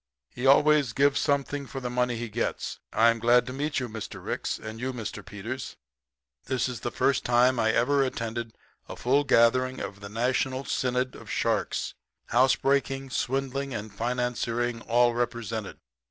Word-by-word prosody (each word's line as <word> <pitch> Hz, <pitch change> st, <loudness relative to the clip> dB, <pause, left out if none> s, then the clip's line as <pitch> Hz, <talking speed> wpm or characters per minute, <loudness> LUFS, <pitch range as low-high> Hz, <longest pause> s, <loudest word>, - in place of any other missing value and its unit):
He 125 Hz, +2 st, -2 dB
always 145 Hz, -2 st, +5 dB
gives 140 Hz, 0 st, +3 dB
something 140 Hz, -1 st, 0 dB
for 135 Hz, -, -6 dB
the 125 Hz, -, -4 dB
money 125 Hz, -1 st, +1 dB
he 120 Hz, +1 st, -4 dB
gets. 115 Hz, +2 st, -3 dB
I'm 115 Hz, +1 st, +4 dB
glad 120 Hz, +2 st, +4 dB
to 130 Hz, -, -6 dB
meet 145 Hz, +3 st, -1 dB
you, 130 Hz, -, -3 dB
Mr. 110 Hz, -2 st, -7 dB
Ricks -, -, -2 dB
you -, -, -14 dB
and 110 Hz, +1 st, -7 dB
Mr. 125 Hz, -3 st, -4 dB
Peters. 110 Hz, +5 st, -6 dB, 0.7 s
This 130 Hz, -2 st, 0 dB
is 125 Hz, -2 st, -5 dB
the -, -, -3 dB
first 135 Hz, +2 st, +1 dB
time 120 Hz, +1 st, +3 dB
I 110 Hz, -1 st, +3 dB
ever 140 Hz, +5 st, +3 dB
attended 115 Hz, -3 st, -3 dB, 0.3 s
a -, -, -6 dB
full 140 Hz, +4 st, +2 dB
gathering 130 Hz, 0 st, +3 dB
of 100 Hz, +1 st, -6 dB
the 100 Hz, 0 st, -8 dB
National 130 Hz, +4 st, 0 dB
Synod 125 Hz, 0 st, -1 dB
of -, -, -12 dB
Sharks -, -, -1 dB, 0.4 s
housebreaking, 135 Hz, +1 st, +2 dB
swindling, 135 Hz, +1 st, -2 dB
and 105 Hz, 0 st, -6 dB
financiering 120 Hz, 0 st, -1 dB
all 120 Hz, +1 st, +4 dB
represented. 120 Hz, -3 st, -3 dB
125 Hz, 160 wpm, -27 LUFS, 115-135 Hz, 0.7 s, always